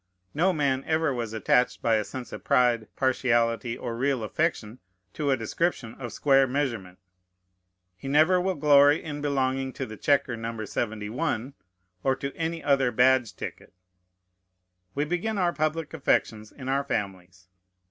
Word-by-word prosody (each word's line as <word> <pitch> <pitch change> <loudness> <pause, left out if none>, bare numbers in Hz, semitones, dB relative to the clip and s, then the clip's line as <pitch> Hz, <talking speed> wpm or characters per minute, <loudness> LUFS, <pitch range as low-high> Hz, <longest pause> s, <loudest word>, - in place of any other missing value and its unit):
No 175 +5 +2
man 140 -5 0
ever 160 -2 +1
was 120 -3 -4
attached 110 +3 +1
by 115 -1 +3
a 105 - 0
sense 125 +2 -8
of - - -8
pride, 120 -3 +2
partiality, 120 -3 +1
or 120 -2 -5
real 130 -1 0
affection, 120 -2 -2 0.3
to 150 -2 -2
a 135 - +3
description 115 0 -2
of 120 -2 -7
square 135 +2 +3
measurement. 120 -9 -3 1.0
He 115 - -9
never 155 +6 +4
will 190 0 -1
glory 145 0 +5
in 145 -2 -6
belonging 135 -2 -1
to 135 - -4
the 110 -2 -9
chequer 135 -2 +1
No. 115 -1 -5
71, 110 +4 -3 0.5
or 135 0 +2
to 140 +1 -6
any 165 0 -3
other 135 -3 +2
badge 125 -3 +3
ticket. - - -8 1.2
We 145 +1 0
begin 180 +7 -2
our 175 -2 +1
public 155 0 -2
affections 110 -7 0
in 130 -2 -10
our 135 +1 +1
families. 95 -7 -5
130 Hz, 150 wpm, -26 LUFS, 115-145 Hz, 1.2 s, glory